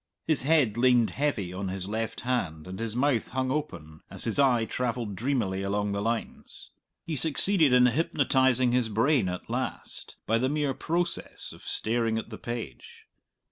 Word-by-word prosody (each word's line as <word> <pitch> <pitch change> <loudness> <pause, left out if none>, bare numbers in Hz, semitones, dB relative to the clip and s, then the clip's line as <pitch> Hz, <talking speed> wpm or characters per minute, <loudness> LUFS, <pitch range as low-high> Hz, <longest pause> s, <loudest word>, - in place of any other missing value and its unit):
His 155 -3 +1
head 135 -6 +3
leaned 120 -2 +4
heavy 120 -11 -1
on 95 +1 -4
his 95 0 -3
left 110 +2 -3
hand 85 -12 -2
and 95 +2 -7
his 115 -1 -2
mouth 130 -2 +1
hung 130 0 -2
open, 85 - -5
as - - -2
his 115 +3 +1
eye 125 -5 +4
travelled 115 -3 -2
dreamily 110 -6 -1
along 100 +1 -1
the 100 0 -2
lines. 115 +2 -4 0.3
He 160 - -3
succeeded 160 +3 +3
in 125 0 +6
hypnotizing 130 -2 +3
his 125 -2 +1
brain 115 0 +2
at 90 0 -6
last, - - -4
by 115 +1 +2
the 130 +2 +1
mere 145 -2 0
process 170 +4 -3
of - - -14
staring 115 0 -1
at 110 - -5
the 110 - -7
page. 115 - -7
120 Hz, 170 wpm, -28 LUFS, 105-135 Hz, 0.3 s, in